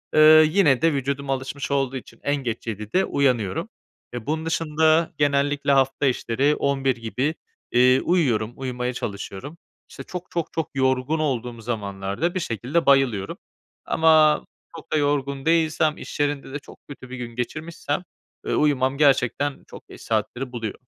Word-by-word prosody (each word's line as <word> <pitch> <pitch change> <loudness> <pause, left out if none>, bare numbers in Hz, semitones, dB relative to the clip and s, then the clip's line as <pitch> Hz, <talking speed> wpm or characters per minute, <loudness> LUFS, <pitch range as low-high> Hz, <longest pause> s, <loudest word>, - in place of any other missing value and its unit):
eee, 155 0 +8
yine 160 -9 +3
de 165 -2 +3
vücudum 140 0 -2
alışmış 135 +2 -3
olduğu 135 -1 0
için 115 -2 -12
en 145 - +1
geç 120 -5 -4
07.00'de 110 - -1
uyanıyorum. 125 -9 0 0.4
E, 120 -3 -6
bunun 160 +3 -2
dışında 160 0 +2
genellikle 145 0 +1
hafta 135 +1 +2
içleri 135 +3 +1
23.00 135 -2 0
gibi, 125 +7 -2 0.4
iii, 125 +1 +5
uyuyorum, 120 -11 +1
uyumaya 125 -1 -3
çalışıyorum. 105 - -6 0.3
İşte, - - -9
çok, 180 0 -8
çok, 170 -2 -3
çok 160 -2 -2
yorgun 130 +3 +1
olduğum 125 -6 -2
zamanlarda 100 - -3
bir 185 - +1
şekilde 135 - -1
bayılıyorum 130 -8 +2 0.5
ama 155 -2 +4 0.3
çok 165 - -12
da - - +2
yorgun 140 -1 -1
değilsem, 160 -1 +2
iş - - -8
yerinde 145 -2 -1
de 145 - -3
çok - - -16
kötü 130 -3 -11
bir 130 - -7
gün 120 -1 -7
geçirmişsem, 155 +5 -4 0.4
ııı, - - 0
uyumam 135 -2 +2
gerçekten 140 -1 +2
çok - - -13
geç - - -13
saatleri 120 +4 -2
buluyor. 115 -4 -5
140 Hz, 150 wpm, -23 LUFS, 125-155 Hz, 0.5 s, eee